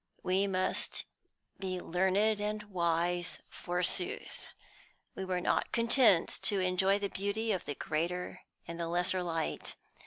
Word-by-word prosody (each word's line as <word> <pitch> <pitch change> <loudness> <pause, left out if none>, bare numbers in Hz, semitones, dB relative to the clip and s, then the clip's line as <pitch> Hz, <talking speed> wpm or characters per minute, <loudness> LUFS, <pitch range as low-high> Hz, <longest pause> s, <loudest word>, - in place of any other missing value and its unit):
We 190 +2 +2
must 185 -1 -1 0.5
be 185 -2 -2
learned 190 +5 +2
and 210 0 -2
wise, 175 -2 0
forsooth. 180 +1 -2 0.7
We 190 - -5
were 185 -1 -1
not - - +1
content 230 -6 +4
to 200 - +2
enjoy 185 +2 +3
the 205 0 -1
beauty 205 +4 -1
of 190 -4 -1
the 145 - -3
greater 170 +5 -2 0.3
and 170 0 -6
the 170 - -1
lesser 180 +2 +1
light. 165 -2 -2
185 Hz, 130 wpm, -32 LUFS, 175-200 Hz, 0.7 s, content